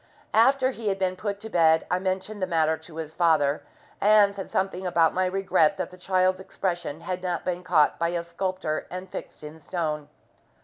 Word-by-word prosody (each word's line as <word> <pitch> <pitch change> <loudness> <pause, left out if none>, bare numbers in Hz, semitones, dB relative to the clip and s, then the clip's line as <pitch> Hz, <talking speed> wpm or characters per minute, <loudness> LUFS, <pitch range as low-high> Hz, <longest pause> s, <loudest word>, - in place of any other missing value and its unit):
After 260 +3 +4
he 230 -4 -6
had 195 -1 +1
been 185 -1 0
put 200 +1 -4
to 220 - -6
bed 160 -1 +4
I 180 - +2
mentioned 190 +2 -3
the 185 - 0
matter 160 -2 +2
to 160 0 -14
his 160 -1 -6
father, 155 -4 +2 0.4
and 205 -1 +5
said 195 -1 -7
something 190 -1 -1
about 165 -2 +3
my 185 0 +1
regret 185 -4 +2
that - - -4
the - - -11
child's 185 0 +1
expression 175 -4 -3
had 180 +1 -4
not 180 -2 -3
been 180 0 -2
caught 165 -5 +3
by 170 0 +1
a 170 0 -2
sculptor 170 -2 -3
and 185 +1 -6
fixed - - -8
in 150 +2 -9
stone. 155 -3 -3
180 Hz, 195 wpm, -26 LUFS, 165-190 Hz, 0.4 s, and